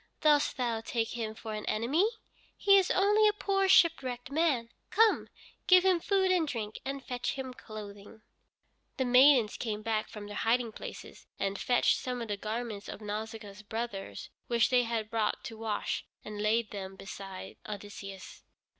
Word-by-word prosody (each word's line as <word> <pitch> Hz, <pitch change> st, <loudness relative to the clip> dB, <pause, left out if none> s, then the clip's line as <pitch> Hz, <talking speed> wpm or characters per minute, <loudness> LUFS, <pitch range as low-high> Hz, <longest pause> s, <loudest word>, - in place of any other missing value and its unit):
Dost 300 Hz, -1 st, +3 dB
thou 235 Hz, -3 st, -1 dB
take 225 Hz, 0 st, -1 dB
him 220 Hz, -2 st, -4 dB
for 220 Hz, 0 st, -6 dB
an 210 Hz, 0 st, -4 dB
enemy? 280 Hz, -, +2 dB, 0.5 s
He 395 Hz, -1 st, +5 dB
is 375 Hz, -, 0 dB
only 415 Hz, +3 st, +4 dB
a 420 Hz, -, +3 dB
poor 390 Hz, -2 st, +1 dB
shipwrecked 265 Hz, -9 st, +3 dB
man. 280 Hz, -7 st, +1 dB, 0.2 s
Come, 440 Hz, +3 st, +3 dB, 0.4 s
give 365 Hz, 0 st, +7 dB
him 370 Hz, -2 st, +4 dB
food 380 Hz, +1 st, +2 dB
and 345 Hz, -4 st, +2 dB
drink, 220 Hz, -5 st, -4 dB
and 275 Hz, 0 st, -5 dB
fetch 250 Hz, 0 st, -2 dB
him 260 Hz, -1 st, -5 dB
clothing." 210 Hz, -2 st, -10 dB, 0.7 s
The 260 Hz, -, +1 dB
maidens 250 Hz, -3 st, +6 dB
came 215 Hz, -3 st, -3 dB
back 220 Hz, -1 st, -1 dB
from 210 Hz, -1 st, -8 dB
their 205 Hz, 0 st, -7 dB
hiding 235 Hz, 0 st, +1 dB
places, -, -, -9 dB
and 195 Hz, 0 st, -2 dB
fetched 245 Hz, -, +3 dB
some 250 Hz, -1 st, -3 dB
of 230 Hz, -2 st, -5 dB
the 205 Hz, -, -1 dB
garments 215 Hz, 0 st, -4 dB
of -, -, -7 dB
Nausicaa's 210 Hz, -1 st, -6 dB
brothers 215 Hz, -2 st, -5 dB, 0.2 s
which 235 Hz, +2 st, +2 dB
they 250 Hz, -1 st, +5 dB
had 225 Hz, -2 st, -3 dB
brought 220 Hz, -2 st, 0 dB
to 225 Hz, -, -7 dB
wash, 220 Hz, -2 st, -2 dB, 0.2 s
and 210 Hz, -1 st, -6 dB
laid 220 Hz, +1 st, +1 dB
them 195 Hz, -2 st, -6 dB
beside 195 Hz, -1 st, -8 dB
Odysseus. 200 Hz, -2 st, -8 dB
230 Hz, 165 wpm, -31 LUFS, 210-275 Hz, 0.7 s, give